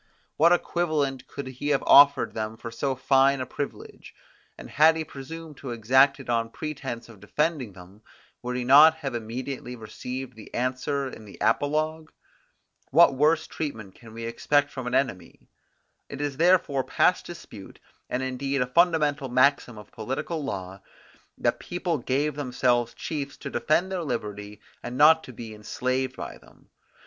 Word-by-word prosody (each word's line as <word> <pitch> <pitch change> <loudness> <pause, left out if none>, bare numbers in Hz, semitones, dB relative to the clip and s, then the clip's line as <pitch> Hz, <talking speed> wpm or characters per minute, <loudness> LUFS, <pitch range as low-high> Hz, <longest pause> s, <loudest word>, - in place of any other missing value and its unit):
What 165 +3 +5
equivalent 150 -7 0
could 140 - -7
he 130 +2 -6
have 145 -2 +1
offered 140 -1 +6
them 110 0 -4
for 115 0 -8
so 135 +3 -2
fine 135 +1 +3
a 130 - -2
privilege? 140 +3 -7 0.4
And - - -10
had 160 +3 +5
he 160 - -2
presumed 155 +1 -9
to 135 - -8
exact 130 +5 +3
it 135 - -10
on 115 -1 0
pretense 135 -4 -6
of 115 -4 -15
defending 130 - -2
them, 95 +3 -15 0.4
would 125 0 -4
he 125 - -2
not 150 +5 +8
have 140 -5 -5
immediately 125 +2 -5
received 125 +3 -7
the 110 - -13
answer 130 +3 -1
in 110 -4 -10
the 100 - -13
apologue? 155 +2 0 0.8
What 165 +2 +6
worse 155 +4 +2
treatment 110 -11 -6
can 115 -2 -15
we 115 +1 -7
expect 145 +5 +1
from 130 -2 -6
an - - -1
enemy? 100 -11 -3 0.6
It 140 - -7
is 145 -2 -3
therefore 165 -5 +3
past 180 - +1
dispute, 115 - -11 0.3
and 125 +1 -2
indeed 130 +1 -1
a - - -4
fundamental 150 -2 +2
maxim 130 -2 +2
of 105 - -12
political 135 +8 -4
law, 95 -6 -6 0.6
that - - 0
people 175 -3 -3
gave 140 +5 0
themselves 125 -4 0
chiefs 140 -3 -5
to 140 - -7
defend 155 +9 +1
their 185 -2 -2
liberty 105 -6 -5 0.2
and 120 +1 -6
not 160 +3 +6
be 110 -1 -8
enslaved 130 +5 -2
by - - -7
them. - - -22
135 Hz, 160 wpm, -26 LUFS, 120-150 Hz, 0.8 s, not